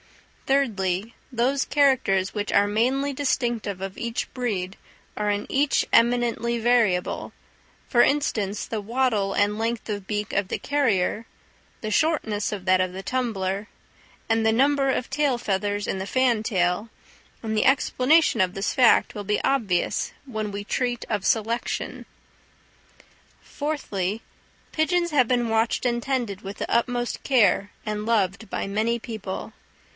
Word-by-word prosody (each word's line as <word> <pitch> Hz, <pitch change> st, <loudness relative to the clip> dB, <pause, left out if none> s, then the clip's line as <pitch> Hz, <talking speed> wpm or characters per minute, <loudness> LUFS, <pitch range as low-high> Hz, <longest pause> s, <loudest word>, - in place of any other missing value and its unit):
Thirdly, 220 Hz, -6 st, 0 dB, 0.2 s
those 260 Hz, +3 st, +1 dB
characters 260 Hz, -10 st, +2 dB
which 205 Hz, -1 st, -3 dB
are 205 Hz, -, +4 dB
mainly 260 Hz, +7 st, +1 dB
distinctive 240 Hz, -7 st, -1 dB
of 195 Hz, 0 st, -5 dB
each 235 Hz, -1 st, -3 dB
breed 200 Hz, -7 st, -2 dB, 0.4 s
are 210 Hz, 0 st, -1 dB
in 205 Hz, 0 st, -1 dB
each 280 Hz, +1 st, +2 dB
eminently 235 Hz, 0 st, +2 dB
variable, 225 Hz, -6 st, +1 dB, 0.6 s
for 240 Hz, -, +4 dB
instance, 215 Hz, -9 st, +1 dB
the 220 Hz, -2 st, -4 dB
wattle 220 Hz, -3 st, 0 dB
and 205 Hz, +1 st, +1 dB
length 230 Hz, +1 st, -2 dB
of 205 Hz, -2 st, -4 dB
beak 210 Hz, -1 st, -3 dB
of 200 Hz, -1 st, 0 dB
the -, -, -2 dB
carrier, 230 Hz, -7 st, 0 dB, 0.6 s
the 215 Hz, -, -3 dB
shortness 220 Hz, -8 st, +1 dB
of 200 Hz, -3 st, -5 dB
that 185 Hz, 0 st, +4 dB
of 185 Hz, -1 st, -1 dB
the 190 Hz, +1 st, -6 dB
tumbler, 205 Hz, -6 st, -2 dB, 0.6 s
and 225 Hz, 0 st, +2 dB
the 220 Hz, -, +4 dB
number 275 Hz, +3 st, +3 dB
of 255 Hz, -1 st, -1 dB
tail 275 Hz, -2 st, +1 dB
feathers 205 Hz, -1 st, -1 dB
in 190 Hz, -, -2 dB
the 190 Hz, -, -4 dB
fantail; 220 Hz, -5 st, +1 dB, 0.5 s
and 220 Hz, -1 st, -2 dB
the 215 Hz, -, +2 dB
explanation 270 Hz, -1 st, +3 dB
of 185 Hz, -1 st, +1 dB
this 195 Hz, +1 st, -1 dB
fact 250 Hz, -3 st, +4 dB
will 205 Hz, -, -4 dB
be 210 Hz, +1 st, 0 dB
obvious 220 Hz, -10 st, 0 dB
when 215 Hz, -5 st, -4 dB
we 200 Hz, 0 st, -5 dB
treat 245 Hz, +2 st, -2 dB
of 205 Hz, -3 st, -1 dB
selection. 230 Hz, +2 st, -1 dB, 1.4 s
Fourthly, 225 Hz, -9 st, -3 dB, 0.5 s
pigeons 345 Hz, +2 st, +1 dB
have 260 Hz, -5 st, +4 dB
been 245 Hz, -2 st, +2 dB
watched 225 Hz, +2 st, +1 dB
and 240 Hz, -1 st, 0 dB
tended 240 Hz, -8 st, -2 dB
with 195 Hz, +1 st, -7 dB
the -, -, -4 dB
utmost 240 Hz, 0 st, 0 dB
care, 205 Hz, -6 st, +3 dB, 0.2 s
and 210 Hz, 0 st, -3 dB
loved 210 Hz, -2 st, 0 dB
by -, -, -2 dB
many 220 Hz, +4 st, 0 dB
people. 215 Hz, -5 st, -6 dB
225 Hz, 145 wpm, -24 LUFS, 200-255 Hz, 1.4 s, are